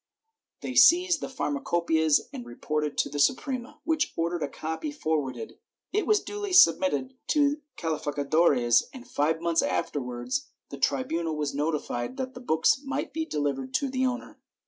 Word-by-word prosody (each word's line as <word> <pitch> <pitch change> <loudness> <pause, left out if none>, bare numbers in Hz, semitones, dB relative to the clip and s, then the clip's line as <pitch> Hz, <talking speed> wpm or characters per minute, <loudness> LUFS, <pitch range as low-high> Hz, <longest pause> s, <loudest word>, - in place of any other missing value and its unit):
They - - -4
seized 355 -1 +6
the - - -3
Pharma 280 +1 -3
copceias 160 -3 +2
and 120 - -6
reported 150 +5 -3
to - - +1
the 145 - -5
Suprema, 255 - 0
which 320 -2 0
ordered 170 +1 -1
a 145 - 0
copy 160 - -5
for 160 - 0
warded. 125 -4 -7 0.3
It 420 +1 0
was 425 -1 +4
duly 410 -2 -5
submitted 280 -7 +4
to 295 0 +2 0.2
calificadores 145 -5 +2
and 255 -1 -11
five 160 +3 0
months 170 -1 +2
afterwards 145 - -2 0.2
the - - -7
tribunal 170 -11 0
was 150 -2 -2
notified 150 - -2
that 260 0 -4
the 250 - -10
books 205 - +2
might 275 0 -3
be 320 +1 -2
delivered 140 -3 -2
to 280 - +1
the 260 0 +1
owner 250 0 -5
170 Hz, 160 wpm, -27 LUFS, -, 0.3 s, seized